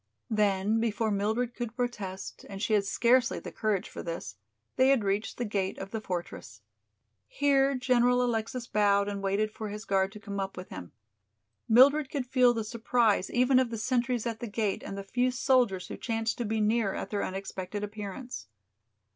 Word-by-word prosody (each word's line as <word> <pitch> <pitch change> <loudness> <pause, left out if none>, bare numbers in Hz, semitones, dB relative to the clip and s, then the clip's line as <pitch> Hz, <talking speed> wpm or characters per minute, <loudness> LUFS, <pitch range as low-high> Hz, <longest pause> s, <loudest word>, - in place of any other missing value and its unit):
Then 210 0 +2
before 225 -1 0
Mildred 220 +4 0
could 240 -1 -5
protest, 210 -7 -4
and 195 -1 -7
she 215 - 0
had 205 -2 +3
scarcely 240 +4 +3
the - - -7
courage 215 -4 -1
for - - -8
this, 165 - -6 0.4
they 260 0 +4
had 270 -5 +4
reached 200 +2 -1
the 245 - -2
gate 200 -3 -2
of 195 +1 -7
the 220 - -3
fortress. 170 - -6 0.7
Here 275 - +2
General 250 -1 +3
Alexis 235 +1 -2
bowed 200 -2 +2
and 200 -1 -3
waited 200 +2 0
for 215 0 -6
his 210 +1 -7
guard 190 0 +1
to 210 - -9
come 200 -1 -5
up 195 0 -4
with 180 - -8
him. 90 -2 -8 0.8
Mildred 270 +5 +6
could 275 -3 -2
feel 250 -1 +4
the 230 -2 -2
surprise 225 -2 +1
even 255 +1 +4
of 255 -2 +1
the 230 - -4
sentries 245 0 0
at 230 -1 -3
the 235 - -5
gate 210 -2 -1
and 195 - -6
the 195 - -5
few 245 +6 +1
soldiers 245 -7 +2
who - - -7
chanced 225 -1 -1
to 240 - -1
be 220 +1 -1
near 215 -1 +1
at - - -5
their 205 - -1
unexpected 195 +1 -5
appearance. 210 - -6
220 Hz, 190 wpm, -29 LUFS, 200-245 Hz, 0.8 s, Mildred